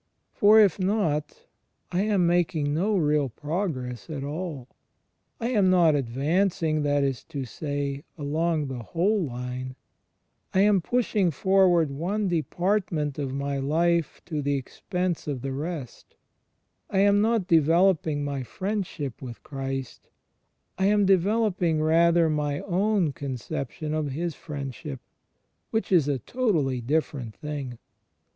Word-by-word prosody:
For, 210 Hz, +2 st, +6 dB
if 200 Hz, -3 st, +4 dB
not, 185 Hz, -7 st, -1 dB, 0.5 s
I 180 Hz, -, +1 dB
am 200 Hz, -4 st, +2 dB
making 170 Hz, -4 st, +1 dB
no 195 Hz, +7 st, +1 dB
real 150 Hz, -4 st, +2 dB
progress 145 Hz, -, -4 dB
at 145 Hz, -3 st, -4 dB
all. 150 Hz, -3 st, -5 dB, 0.7 s
I 235 Hz, 0 st, -1 dB
am 205 Hz, -7 st, +3 dB
not 175 Hz, -4 st, +5 dB
advancing, 155 Hz, +5 st, 0 dB
that 145 Hz, -1 st, +2 dB
is 135 Hz, -3 st, -1 dB
to 140 Hz, -3 st, -5 dB
say, 140 Hz, +1 st, -4 dB
along 155 Hz, +1 st, 0 dB
the 130 Hz, -2 st, -5 dB
whole 185 Hz, -, +1 dB
line: 125 Hz, -1 st, -5 dB, 0.8 s
I 190 Hz, -, +5 dB
am 200 Hz, -2 st, +4 dB
pushing 215 Hz, -3 st, +1 dB
forward 175 Hz, -1 st, +3 dB
one 190 Hz, +9 st, -1 dB
department 170 Hz, -3 st, -1 dB
of 140 Hz, -2 st, -2 dB
my 140 Hz, +1 st, -2 dB
life 165 Hz, +3 st, 0 dB
to 155 Hz, -4 st, -3 dB
the 140 Hz, 0 st, 0 dB
expense 180 Hz, +6 st, -3 dB
of 135 Hz, -4 st, -3 dB
the 135 Hz, -, -2 dB
rest: 145 Hz, -1 st, -6 dB, 0.7 s
I 190 Hz, -, +2 dB
am 205 Hz, 0 st, +4 dB
not 225 Hz, -2 st, +2 dB
developing 165 Hz, -2 st, +3 dB
my 140 Hz, -1 st, -3 dB
Friendship 175 Hz, -, -4 dB
with 120 Hz, -3 st, -8 dB
Christ: 135 Hz, -2 st, -5 dB, 0.7 s
I 190 Hz, -, +3 dB
am 205 Hz, 0 st, +4 dB
developing, 190 Hz, -3 st, +2 dB
rather, 165 Hz, +2 st, +4 dB
my 150 Hz, -2 st, -1 dB
own 190 Hz, -3 st, +1 dB
conception 140 Hz, +3 st, -5 dB
of 155 Hz, -1 st, -1 dB
His 165 Hz, +5 st, -3 dB
Friendship 140 Hz, -1 st, -6 dB, 0.7 s
(which 220 Hz, -2 st, -2 dB
is 165 Hz, -6 st, +4 dB
a 145 Hz, -2 st, +1 dB
totally 155 Hz, -, 0 dB
different 130 Hz, -3 st, -2 dB
thing). 145 Hz, -5 st, -5 dB
155 Hz, 130 wpm, -26 LUFS, 140-185 Hz, 0.8 s, For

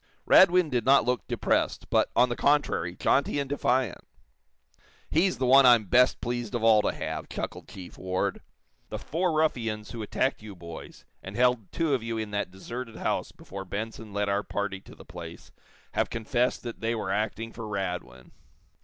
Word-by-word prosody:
Radwin 180 Hz, -3 st, +6 dB
did 120 Hz, -2 st, +1 dB
not 135 Hz, -1 st, +5 dB
look 125 Hz, 0 st, -1 dB
depressed, -, -, 0 dB
but, -, -, +3 dB
on 125 Hz, -, +5 dB
the 120 Hz, -, -2 dB
contrary, 140 Hz, -, +1 dB
jaunty 140 Hz, +7 st, +1 dB
and 140 Hz, -, -2 dB
defiant. 130 Hz, -6 st, 0 dB, 1.1 s
"He's 180 Hz, +4 st, +2 dB
the 130 Hz, -, 0 dB
one 135 Hz, +2 st, +7 dB
I'm 120 Hz, -3 st, +7 dB
best 125 Hz, +8 st, +4 dB
pleased 120 Hz, -1 st, -3 dB
of 115 Hz, -, -2 dB
all 110 Hz, -2 st, +6 dB
to -, -, 0 dB
have," -, -, -5 dB
chuckled -, -, -5 dB
Chief 90 Hz, -2 st, -11 dB
Ward. 95 Hz, 0 st, -2 dB, 0.5 s
"The -, -, -4 dB
four 175 Hz, +4 st, -1 dB
ruffians 115 Hz, -9 st, -1 dB
who 115 Hz, -, -6 dB
attacked 120 Hz, +5 st, -1 dB
you 105 Hz, -2 st, -9 dB
boys, 85 Hz, -2 st, -10 dB, 0.2 s
and 95 Hz, +2 st, -9 dB
held 125 Hz, -4 st, +2 dB
two 165 Hz, -3 st, 0 dB
of 130 Hz, -, +1 dB
you 115 Hz, 0 st, -3 dB
in 110 Hz, -1 st, -4 dB
that 100 Hz, -2 st, -2 dB
deserted 115 Hz, +5 st, -7 dB
house -, -, -2 dB
before 95 Hz, 0 st, -9 dB
Benson 110 Hz, +3 st, -6 dB
led 100 Hz, 0 st, -1 dB
our 100 Hz, 0 st, +1 dB
party 100 Hz, -1 st, -3 dB
to -, -, -15 dB
the -, -, -14 dB
place, 85 Hz, -1 st, -10 dB, 0.4 s
have -, -, 0 dB
confessed 120 Hz, +2 st, -1 dB
that 120 Hz, -2 st, -6 dB
they 115 Hz, +1 st, -1 dB
were 100 Hz, -4 st, -3 dB
acting 110 Hz, +2 st, -2 dB
for 115 Hz, -2 st, -7 dB
Radwin. 90 Hz, -11 st, -5 dB
115 Hz, 180 wpm, -27 LUFS, 100-125 Hz, 1.1 s, one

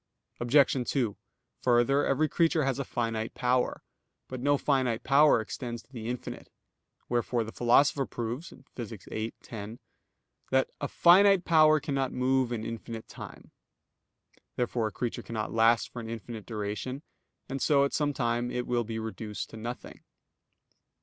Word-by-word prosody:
Obj. 130 Hz, 0 st, +3 dB
2: 120 Hz, -7 st, 0 dB, 0.5 s
Further, 125 Hz, +3 st, +3 dB
every 155 Hz, +3 st, +2 dB
creature 165 Hz, -1 st, +2 dB
has 135 Hz, 0 st, 0 dB
a -, -, 0 dB
finite 115 Hz, -3 st, -3 dB
power. 125 Hz, 0 st, 0 dB, 0.4 s
But 130 Hz, -, -6 dB
no 145 Hz, +3 st, +2 dB
finite 130 Hz, -5 st, 0 dB
power 145 Hz, 0 st, +5 dB
extends 120 Hz, +2 st, -5 dB
to 135 Hz, -, -29 dB
the 115 Hz, -3 st, -6 dB
infinite. 125 Hz, 0 st, -6 dB, 0.6 s
Wherefore 120 Hz, 0 st, 0 dB
the 110 Hz, -, -7 dB
Philosopher 135 Hz, +4 st, +3 dB
proves 120 Hz, +7 st, -4 dB, 0.3 s
(Phys. 115 Hz, -4 st, -7 dB
viii, 110 Hz, +1 st, -4 dB
10) 110 Hz, 0 st, -7 dB, 0.7 s
that, 130 Hz, 0 st, +2 dB
"a -, -, -1 dB
finite 190 Hz, +1 st, +5 dB
power 155 Hz, -2 st, +6 dB
cannot 135 Hz, -3 st, -1 dB
move 130 Hz, -1 st, +1 dB
in 110 Hz, -2 st, -3 dB
infinite 115 Hz, 0 st, -6 dB
time." -, -, -11 dB, 1.0 s
Therefore 120 Hz, -2 st, 0 dB
a -, -, -5 dB
creature 120 Hz, +3 st, -3 dB
cannot 110 Hz, -2 st, -4 dB
last 115 Hz, 0 st, +4 dB
for 120 Hz, -, -7 dB
an 115 Hz, -1 st, -6 dB
infinite 115 Hz, -1 st, -7 dB
duration; 110 Hz, +6 st, -4 dB, 0.4 s
and 135 Hz, 0 st, -4 dB
so 140 Hz, -2 st, +4 dB
at 140 Hz, -, -3 dB
some 150 Hz, -1 st, +1 dB
time 120 Hz, -2 st, -1 dB
it 125 Hz, 0 st, -2 dB
will 120 Hz, -1 st, 0 dB
be 110 Hz, 0 st, -5 dB
reduced 110 Hz, -1 st, -5 dB
to -, -, -9 dB
nothing. 120 Hz, +3 st, -7 dB
120 Hz, 150 wpm, -29 LUFS, 115-135 Hz, 1.0 s, power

